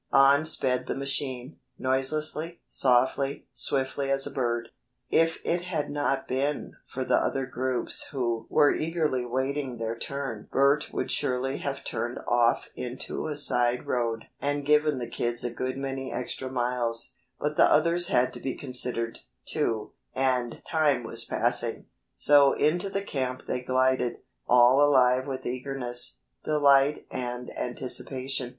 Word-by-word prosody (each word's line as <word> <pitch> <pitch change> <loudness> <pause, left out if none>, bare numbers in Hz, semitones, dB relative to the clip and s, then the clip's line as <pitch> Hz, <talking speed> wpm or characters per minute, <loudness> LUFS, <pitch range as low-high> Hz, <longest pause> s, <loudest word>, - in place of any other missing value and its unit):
On 140 +2 +5
sped 130 -4 0
the - - -2
machine, 135 -1 -2 0.2
noiselessly, 155 +5 0
softly, 130 +2 +1
swiftly 135 +1 -1
as 135 0 +2
a - - -4
bird. 120 -3 -1 0.4
If 165 0 +3
it 170 +1 +1
had 160 -5 -2
not 145 -2 -1
been 140 +3 -2
for 130 - -4
the - - +3
other 135 -1 0
groups 130 -1 -1
who 120 -5 -2
were 145 -2 +4
eagerly 155 -6 -1
waiting 130 +1 -2
their 115 0 -3
turn 135 -3 -5
Bert 140 +2 +3
would - - -2
surely 135 -1 0
have 140 -1 -4
turned 120 +1 -3
off 120 -1 +2
into 125 +4 -5
a 150 - -3
side 125 -4 +2
road 115 -2 -1 0.2
and 145 0 -1
given 150 -1 +3
the 120 -2 -4
kids 120 0 -2
a 120 - -1
good 130 +2 -3
many 135 -1 -4
extra 130 +1 -4
miles; 120 -1 -1 0.3
but 150 +1 -1
the - - +5
others 170 +3 +4
had 125 -9 +2
to - - -7
be 130 - -3
considered, 125 -3 -2 0.3
too, 110 -2 -1 0.2
and 130 -2 0
time 150 -6 +2
was - - 0
passing, - - 0 0.3
so 145 -1 +5
into 175 +6 +1
the 195 0 -2
camp 130 -8 -3
they 125 - -2
glided, 130 -1 +1 0.3
all 125 +3 +6
alive 130 -2 +4
with 135 -1 -5
eagerness, 125 - -2 0.2
delight 145 -1 +3
and 125 0 -5
anticipation. 130 +1 -3
130 Hz, 145 wpm, -27 LUFS, 125-145 Hz, 0.4 s, all